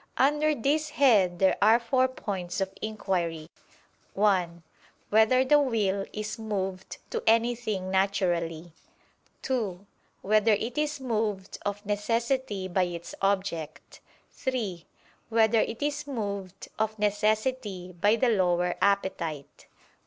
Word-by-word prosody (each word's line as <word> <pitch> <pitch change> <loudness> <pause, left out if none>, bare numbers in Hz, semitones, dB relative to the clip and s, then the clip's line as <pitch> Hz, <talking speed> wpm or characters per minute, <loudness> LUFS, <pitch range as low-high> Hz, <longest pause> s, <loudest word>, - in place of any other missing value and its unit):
Under 295 +3 +3
this 295 +5 0
head 215 - +4
there 190 +1 +3
are 220 +3 +6
four 255 +2 +2
points 195 -9 -5
of 195 0 -2
inquiry: 175 -7 -2 0.6
(1) 180 -5 +1 0.5
Whether 220 +5 +4
the 295 +3 +5
will 205 -8 0
is 215 +2 -5
moved 195 -4 -4
to - - -2
anything 225 -4 +1
naturally? 175 -4 0 0.7
(2) 205 -8 -2 0.4
Whether 215 +2 +4
it 230 +4 -2
is 300 -1 -1
moved 215 -6 -2
of 205 +1 -4
necessity 220 0 -1
by 185 0 +1
its 170 -1 -7
object? 190 -6 -2 0.3
(3) 215 -10 -3 0.4
Whether 225 0 +4
it 230 +5 -1
is 290 0 -2
moved 200 -7 -5
of 220 0 -1
necessity 210 -2 -1
by 205 +6 +3
the 240 +2 +2
lower 180 -4 +2
appetite? 180 -7 -1
205 Hz, 115 wpm, -27 LUFS, 185-235 Hz, 0.7 s, are